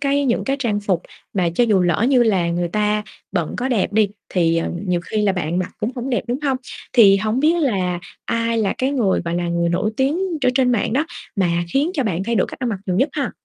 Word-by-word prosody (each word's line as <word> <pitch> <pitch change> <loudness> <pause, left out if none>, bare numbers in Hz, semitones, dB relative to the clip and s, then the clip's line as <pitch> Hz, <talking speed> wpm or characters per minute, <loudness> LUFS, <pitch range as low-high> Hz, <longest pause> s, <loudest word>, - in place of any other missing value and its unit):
cái 280 0 +1
những 245 -3 +1
cái 275 0 0
trang 220 -6 0
phục 190 -4 0 0.3
mà 180 -4 +1
cho 240 - +4
dù 210 -5 +3
lỡ 175 +6 +2
như 260 -3 +5
là 195 -7 +2
người 175 0 -1
ta 210 +3 0 0.3
bận 175 -5 -1
có 250 +2 -1
đẹp 225 -7 0
đi 215 -1 +3 0.2
thì, 165 -2 +2
ờ, 165 - -1 0.2
nhiều 180 -1 +1
khi 210 +4 -2
là 200 - +3
bạn 175 -1 -2
mặc 185 - -2
cũng 215 - -1
hổng 245 +2 -3
đẹp, 245 - 0
đúng 250 +3 -1
hông? 270 -2 +2 0.4
Thì 205 -6 +7
hổng 215 +5 0
biết 315 +4 +3
là 185 -9 0 0.2
ai 230 0 0
là 205 -3 +1
cái 260 +1 +1
người 230 -9 +1
mà 170 - -2
là 175 0 -1
người 170 0 +1
nổi 175 +5 0
tiếng 275 +5 +1 0.2
ở 255 - +4
trên 255 -1 +3
mạng 220 -2 0
đó 280 +6 +2 0.3
mà 175 -3 +1
khiến 285 +5 +2
cho 280 - +1
bạn 185 -4 -1
thay 235 +2 -1
đổi 195 - +2
cách - - -9
ăn 250 - -1
mặc 210 -4 -2
nhiều 180 -2 0
nhất 270 +9 +3
ha? 280 -4 -2
210 Hz, 260 wpm, -20 LUFS, 180-255 Hz, 0.4 s, Thì